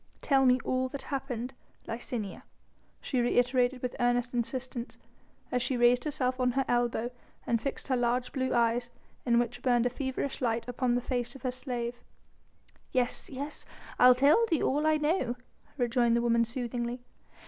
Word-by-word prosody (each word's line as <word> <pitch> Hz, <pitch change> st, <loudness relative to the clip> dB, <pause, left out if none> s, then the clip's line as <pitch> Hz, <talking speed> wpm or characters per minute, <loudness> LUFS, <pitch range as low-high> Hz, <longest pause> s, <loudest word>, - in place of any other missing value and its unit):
"Tell 270 Hz, -2 st, +4 dB
me 250 Hz, 0 st, +5 dB
all 255 Hz, 0 st, 0 dB
that 280 Hz, +1 st, -6 dB
happened, 265 Hz, -3 st, -4 dB, 0.3 s
Licinia," 225 Hz, -3 st, -4 dB, 0.6 s
she 255 Hz, -3 st, 0 dB
reiterated 245 Hz, +1 st, +2 dB
with 250 Hz, -, -2 dB
earnest 245 Hz, 0 st, +1 dB
insistence, 245 Hz, 0 st, -3 dB, 0.5 s
as 250 Hz, -, +1 dB
she 255 Hz, +1 st, 0 dB
raised 240 Hz, +2 st, +4 dB
herself 260 Hz, -4 st, -1 dB
on 250 Hz, -1 st, +2 dB
her 270 Hz, +1 st, +1 dB
elbow 240 Hz, 0 st, 0 dB, 0.3 s
and 230 Hz, -1 st, +1 dB
fixed 275 Hz, -, -4 dB
her 265 Hz, -, +2 dB
large 245 Hz, +1 st, 0 dB
blue 260 Hz, -1 st, -1 dB
eyes, 235 Hz, 0 st, +2 dB, 0.4 s
in 235 Hz, -1 st, +4 dB
which 240 Hz, 0 st, 0 dB
burned 245 Hz, -2 st, +3 dB
a 245 Hz, -, +1 dB
feverish 265 Hz, +1 st, -3 dB
light, 230 Hz, -1 st, 0 dB
upon 245 Hz, 0 st, 0 dB
the 245 Hz, -, +1 dB
face 245 Hz, 0 st, -2 dB
of 270 Hz, -, -12 dB
her 255 Hz, -, 0 dB
slave. 245 Hz, -2 st, -4 dB, 0.9 s
"Yes! 250 Hz, -1 st, 0 dB
yes! 285 Hz, +2 st, -5 dB, 0.4 s
I'll 250 Hz, 0 st, +8 dB
tell 285 Hz, -, +5 dB
thee 325 Hz, -, +1 dB
all 295 Hz, +3 st, +1 dB
I 310 Hz, 0 st, +4 dB
know," 300 Hz, -5 st, 0 dB, 0.4 s
rejoined 240 Hz, -2 st, +2 dB
the 235 Hz, -, +2 dB
woman 235 Hz, -1 st, +3 dB
soothingly. 240 Hz, 0 st, -3 dB
245 Hz, 165 wpm, -30 LUFS, 240-260 Hz, 0.9 s, I'll